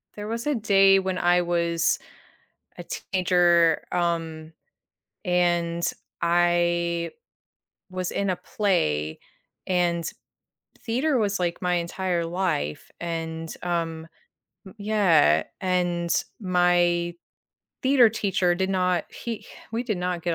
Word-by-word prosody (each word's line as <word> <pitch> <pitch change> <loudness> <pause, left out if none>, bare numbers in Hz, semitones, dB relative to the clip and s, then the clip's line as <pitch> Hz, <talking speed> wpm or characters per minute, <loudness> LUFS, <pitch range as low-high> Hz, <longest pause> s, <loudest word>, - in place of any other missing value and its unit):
There 210 0 -6
was 230 +4 -3
a 295 - +2
day 195 -3 +5
when 190 -1 -2
I 175 0 +3
was 170 -1 +1 0.8
a - - -7
teenager, 175 -3 +2
um, 165 -2 -2 0.7
and 175 -2 +1 0.4
I 170 0 +2 0.8
was 185 -1 -3
in 200 -1 -1
a 185 - 0
play, 80 - -1 0.5
and 175 -2 0 0.7
theater 260 +4 0
was, 205 -2 0
like, 175 0 -2
my 180 -1 +1
entire 175 0 -1
life, 165 - -2
and, 165 -1 -4
um, 165 -2 -2 0.6
m 190 - -12
Yeah, 185 - +4 0.2
and 175 -2 0 0.3
my 175 -2 +2 0.7
theater 260 -3 +6
teacher 195 -5 +1
did 190 +2 -1
not, 180 -2 +1
he 230 -3 -6 0.3
we 230 +2 -1
did 215 -6 -2
not 180 -1 -2
get 170 0 0
175 Hz, 110 wpm, -25 LUFS, 170-190 Hz, 0.8 s, theater